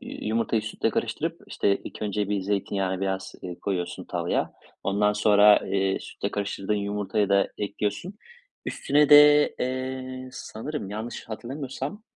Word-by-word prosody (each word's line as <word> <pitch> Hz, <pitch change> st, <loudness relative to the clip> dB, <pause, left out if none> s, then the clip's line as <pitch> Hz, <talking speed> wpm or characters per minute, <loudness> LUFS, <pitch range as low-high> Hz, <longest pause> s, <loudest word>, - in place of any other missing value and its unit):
yumurtayı 110 Hz, 0 st, -1 dB
sütle 110 Hz, -, -1 dB
karıştırıp, -, -, -2 dB
işte, 100 Hz, -1 st, +1 dB
ilk -, -, -8 dB
önce 105 Hz, -1 st, -1 dB
bir 105 Hz, -1 st, 0 dB
zeytinyağını 95 Hz, -1 st, -1 dB
biraz, 95 Hz, 0 st, -2 dB
eee, 90 Hz, -2 st, -6 dB
koyuyorsun 90 Hz, -3 st, -3 dB
tavaya, -, -, -1 dB, 0.3 s
ondan 105 Hz, +1 st, +2 dB
sonra, 105 Hz, 0 st, +6 dB
eee, 95 Hz, 0 st, +1 dB
sütle -, -, -5 dB
karıştırdığın 100 Hz, 0 st, -2 dB
yumurtayı 100 Hz, 0 st, -1 dB
da 100 Hz, 0 st, +3 dB
ekliyorsun. 105 Hz, -, -3 dB, 0.5 s
Üstüne 145 Hz, +1 st, +2 dB
de, 150 Hz, 0 st, +8 dB
eee, 130 Hz, 0 st, -3 dB
sanırım 115 Hz, -2 st, -6 dB
yanlış 110 Hz, +3 st, -6 dB
hatırlamıyorsam, 135 Hz, -, -5 dB
105 Hz, 130 wpm, -26 LUFS, 100-130 Hz, 0.5 s, de